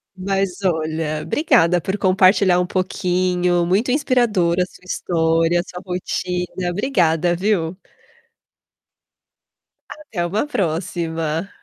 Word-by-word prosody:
Mas 195 0 -2
olha, 160 -3 -1
obrigada 230 - +3
por 190 +4 -3
compartilhar 185 -1 +4
um 180 - +1
pouquinho, 180 -1 0
muito 200 +8 +1
inspiradora 225 - +2
a - - -3
sua 180 - -19
história, 165 -1 +1
a - - -1
sua 180 -1 -9
rotina, 180 0 -3
obrigada 175 - +1
viu? 180 -2 -1 2.2
Até 225 - -5
uma 205 +10 -1
próxima. 165 - -2
180 Hz, 105 wpm, -20 LUFS, 170-195 Hz, 2.2 s, compartilhar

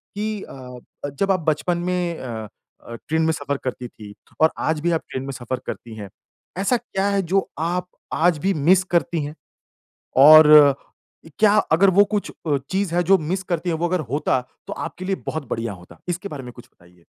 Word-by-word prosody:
कि 210 0 -3
अ, 125 -2 -10 0.4
जब 195 +7 0
आप 185 - +2
बचपन 155 +3 0
में 175 -1 -2
अ 115 -4 -6 0.4
अ, 115 - -7
ट्रेन 160 +1 +1
में 160 0 +2
सफ़र 145 -2 -3
करती 125 -1 -4
थी, 105 -3 -12 0.3
और 160 - +6
आज 160 -1 -1
भी 175 - +1
आप 165 - 0
ट्रेन 130 - -4
में 135 - -5
सफ़र 125 0 -5
करती 115 -2 -7
हैं। 100 -3 -8 0.5
ऐसा 200 +6 +1
क्या 200 -4 -3
है 200 -1 +1
जो 190 +2 0
आप 180 +2 -1 0.3
आज 170 -1 +2
भी 195 - +3
मिस 175 +5 +3
करती 170 -2 +1
हैं? 150 +2 -6 0.8
और 155 +3 +9 0.8
इ - - -13
क्या 210 -1 +5 0.2
अगर 190 +4 +5
वो 205 - +8
कुछ 205 0 -3 0.2
अ, 145 -2 +2
चीज़ 190 -2 -1
है 175 - +3
जो 190 +2 +4
मिस 180 +5 -3
करती 175 -1 -2
है - - 0
वो 175 +2 -1
अगर 180 0 0
होता, 135 -2 +1 0.3
तो - - -7
आपके 180 +2 -6
लिए 195 0 -1
बहुत 155 -5 -4
बढ़िया 115 -1 -3
होता? 90 -2 -14
इसके 180 +3 -3
बारे 145 -6 -7
में 125 - -9
कुछ 120 0 -15
बताइए। 85 0 -24
160 Hz, 205 wpm, -22 LUFS, 135-185 Hz, 0.8 s, और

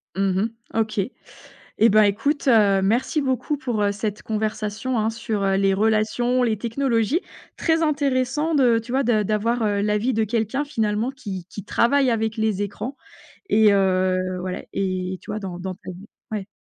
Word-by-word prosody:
Mmh 190 -1 +1 0.3
mh. - - 0
OK, 215 -2 -1 0.8
eh 225 - +6
ben, 215 +1 +6
écoute, 280 +9 0
heu, 205 -5 +5
merci 240 - +1
beaucoup 265 +2 -1
pour, 245 -6 -2
heu, 205 0 +2
cette 205 +1 -4
conversation, 220 +2 -2
hein, 215 - +1
sur, 225 -2 -3
heu, 195 0 +2
les 195 0 +3
relations, 220 +4 +1
les 225 -3 +1
technologies. 235 - 0 0.3
Très 325 0 +1
intéressant 285 0 0
de 250 -5 +4
tu 230 +2 -9
vois, 270 +2 +2
de 220 -4 +2
d'avoir, 225 +3 0
heu, 205 -1 +1
l'avis 210 +4 +1
de 220 0 +1
quelqu'un 230 +6 -1
finalement 220 -2 -1
qui 195 -9 -7
qui 205 - -8
travaille 270 +6 +2
avec 220 0 -1
les 215 -2 0
écrans 225 +7 -5 0.5
et 215 -1 +5
heu, 185 -1 +1
voilà, 185 0 -4
et 185 -1 -2
tu - - -15
vois, 215 - -3
dans 190 -4 -6
dans 185 +1 -4
ta 185 - -9
vie 185 +3 -12 0.2
ouais. 210 -3 -3
220 Hz, 175 wpm, -23 LUFS, 200-245 Hz, 0.8 s, eh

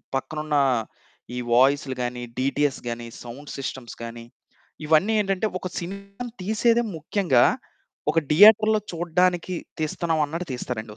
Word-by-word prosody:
పక్కనున్నా 150 +2 0 0.7
ఈ - - -2
వాయిసులు 135 +2 +3
గానీ, 120 0 -4 0.2
డీటీఎస్ 140 +1 0
గానీ, 120 0 -5 0.2
సౌండ్ 125 +5 -9
సిస్టమ్స్ 130 -3 -6
గానీ, 115 0 -8 0.6
ఇవన్నీ 160 +8 +4
ఏంటంటే, 195 +1 0
ఒక 185 - -4
సినిమాని 200 +6 -7
తీసేదే 230 +4 +2
ముఖ్యంగా 160 -5 +3 0.7
ఒక 165 - +3
థియేటర్‌లో 215 +5 +7
చూడడానికి 175 +1 +1 0.3
తీస్తన్నావన్నట్టు 160 +1 -1
తీస్తారండి 115 -3 -5
155 Hz, 110 wpm, -24 LUFS, 130-190 Hz, 0.7 s, థియేటర్‌లో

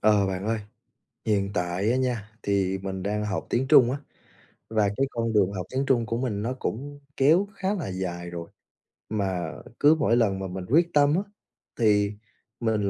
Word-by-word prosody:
Ờ, 105 -2 +4
bạn 95 0 -3
ơi. 115 0 0 0.7
Hiện 100 -2 +1
tại 90 +3 0
á 125 - +2
nha 120 -5 -1
thì 95 -1 +1
mình 95 -1 -4
đang 105 +2 -1
học 105 -2 -3
tiếng 130 +3 +1
Trung 130 -5 +7
á, 135 - -2 0.7
và 110 -2 +2
cái 135 - +2
con 115 -2 -1
đường 100 -3 +3
học 90 -3 -4
tiếng 135 +1 -1
Trung 120 -4 +2
của 115 - -2
mình 115 -5 -2
nó 120 +4 -1
cũng 145 +5 -4 0.2
kéo 160 +9 +4
khá 195 0 -1
là 175 - -3
dài 90 -2 -4
rồi. 85 -1 -7 0.6
Mà 95 -4 -2 0.3
cứ 150 +2 +6
mỗi 140 -6 +2
lần 100 -5 +2
mà 95 - -3
mình 90 0 -6
quyết 170 +5 +3
tâm 145 0 +4
á 185 - +2 0.6
thì 105 -2 +3 0.5
mình 110 -4 +1
110 Hz, 190 wpm, -26 LUFS, 95-130 Hz, 0.7 s, Trung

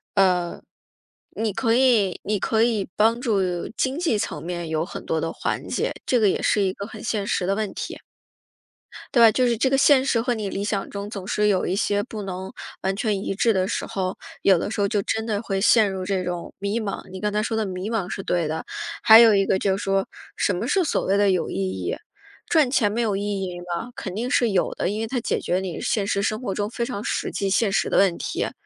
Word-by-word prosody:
呃， 180 -3 +2 0.7
你 220 -2 -1
可 225 +3 +1
以 235 -7 +3
你 210 0 0
可 220 +3 +1
以 225 -4 +1
帮 225 +2 +3
助 220 -5 +1 0.4
经 265 +2 0
济 325 -11 +1
层 - - -4
面 175 0 -4
有 160 0 -1
很 - - -8
多 160 -1 -1
的 165 - -2
缓 - - -3
解， - - -1
这 250 - +2
个 215 - +4
也 190 - +1
是 210 - +2
一 190 -1 +1
个 200 - -6
很 220 0 -10
现 215 -3 -2
实 180 -3 -1
的 195 - +1
问 215 -1 -2
题。 - - -6 1.2
对 240 - +6
吧？ 225 - +9
就 250 +3 +2
是 235 -2 +1
这 265 - +3
个 270 - +2
现 270 -1 +5
实 230 -4 +2
和 245 +1 0
你 215 -4 -3
理 195 +1 -3
想 205 -1 -2
中 200 0 -6
总 195 -4 -6
是 210 0 +1
有 190 -3 +2
一 185 - -1
些 205 -1 +1
不 215 -2 -7
能 190 -1 -5 0.3
完 190 0 -1
全 205 -2 -1
一 195 - -2
致 225 +3 +3
的 190 -2 0
时 - - -2
候， 185 -1 -3 0.2
有 190 -3 +5
的 200 - -3
时 215 - -3
候 200 - +2
就 205 -1 0
真 220 +2 -2
的 210 -2 -1
会 195 -3 -2
陷 215 0 +4
入 190 -1 -4
这 190 -1 -1
种 175 -1 -5
迷 200 +4 -1
茫。 205 -3 -4
你 190 0 -7
刚 210 - 0
才 210 +1 0
说 225 - -2
的 220 -1 0
迷 185 +2 -4
茫 215 -6 -1
是 195 - -4
对 175 -4 0
的， 160 +1 -3 0.4
还 220 0 +9
有 230 -2 +8
一 195 -1 +3
个 190 - +1
就 190 0 +1
是 205 - -5
说 195 0 0 0.3
什 195 - 0
么 210 - -3
是 380 +8 +2
所 325 - 0
谓 195 +1 +2
的 205 -1 +4
有 180 -3 0
意 - - -4
义？ 95 -2 -2 0.5
赚 305 -6 +3
钱 220 -5 +2
没 230 +3 -1
有 215 -3 0
意 195 - -2 0.2
义 180 -1 -5
吗？ 175 +7 -5
肯 190 -6 -6
定 235 +5 -3
是 245 -4 +3
有 190 -3 +1
的， - - -1
因 210 +3 -2
为 - - -1
它 245 +2 -2
解 - - -1
决 180 +1 -1
你 185 -3 -5
现 215 -7 0
实 200 0 0
生 215 +2 -1
活 200 -7 -3
中 205 +1 -2
非 235 0 -2
常 230 -4 -5
实 - - -2
际 195 -1 -2
现 205 +2 +2
实 195 - 0
的 - - +3
问 190 -3 +4
题。 - - -3
205 Hz, 270 characters per minute, -23 LUFS, 190-225 Hz, 1.2 s, 吧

